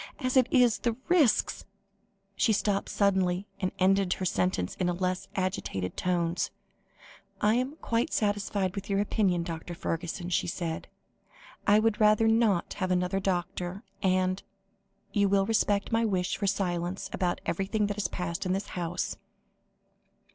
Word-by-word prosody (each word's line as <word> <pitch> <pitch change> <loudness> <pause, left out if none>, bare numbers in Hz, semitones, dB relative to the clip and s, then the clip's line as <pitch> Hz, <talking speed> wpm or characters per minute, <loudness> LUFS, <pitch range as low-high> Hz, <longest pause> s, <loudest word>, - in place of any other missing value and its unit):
As 255 -2 -1
it 255 -2 +5
is, 245 -5 +4
the 235 -2 0
risks" 305 -11 +3 0.7
she 220 - +3
stopped 200 -1 0
suddenly, 190 -2 +1
and 185 -2 -1
ended 190 0 +3
her 185 - -4
sentence 180 - 0
in 180 - +1
less 180 +1 -1
agitated 185 - -2
tones 175 -1 0 0.9
"I 210 +1 +3
am 255 +5 0
quite 230 +1 0
satisfied 205 -2 0
with 195 0 -6
your 200 0 +1
opinion, 195 -4 +1
Dr. 170 0 -6
Fergusson," 175 0 -3
she - - +1
said. 165 -2 -3 0.8
"I 205 +1 +6
would 220 0 +2
rather 215 +1 +5
not 225 -5 +2
have 185 - +1
another 180 +1 +1
doctor, 180 +1 -2 0.2
and 185 0 +1 0.7
you 200 -1 +3
will 195 0 +3
respect 205 -1 +1
my 225 0 +2
wish 185 -5 0
for 200 - -2
silence 185 -1 -1
about 180 -2 0
everything 195 +4 0
that 205 0 -3
has 210 - 0
passed 175 0 -3
in 185 -1 0
this 195 +2 -3
house?" 175 -1 -3
195 Hz, 145 wpm, -29 LUFS, 180-210 Hz, 0.9 s, I